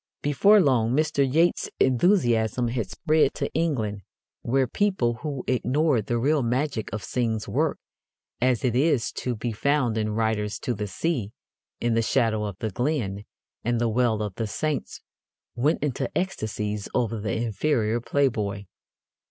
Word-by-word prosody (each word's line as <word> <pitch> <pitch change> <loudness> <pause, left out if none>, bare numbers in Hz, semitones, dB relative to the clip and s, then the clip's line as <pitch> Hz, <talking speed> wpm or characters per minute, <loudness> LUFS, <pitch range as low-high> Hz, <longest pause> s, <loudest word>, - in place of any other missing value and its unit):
Before 195 +9 +5
long 125 - +3
Mr. 145 -3 +1
Yeats's 165 +4 +2
enthusiasm 120 - +2
had 115 -5 -2
spread 155 - +2
to - - -3
England, 120 -11 -1 0.4
where 130 +2 +1
people 125 - 0
who 145 -4 -4
ignored 130 -1 +1
the 120 - 0
real 145 +5 +2
magic 125 0 -1
of 110 - -4
Synge's 115 -4 -1
work, - - 0 0.6
as 125 -1 +2
it 120 -2 +1
is 135 -3 +2
to 125 -1 -3
be 115 +2 -3
found 125 0 +1
in 105 -1 -1
Riders 110 -2 0
to 125 - -1
the 105 -1 -4
Sea, 115 - -2 0.5
In 120 -1 0
the 115 - +3
Shadow 110 -3 +1
of 100 -3 -5
the 110 0 -3
Glen, 105 -5 -2 0.4
and 120 0 0
The 120 -1 +1
Well 110 -2 +1
of 105 -3 -4
the 115 - -1
Saints, 150 +6 -3 0.5
went 140 +6 +1
into 140 -4 -1
ecstasies 105 - -3
over 115 -2 0
the 105 0 -2
inferior 115 0 0
Playboy. 110 -7 0
120 Hz, 150 wpm, -25 LUFS, 110-140 Hz, 0.6 s, Before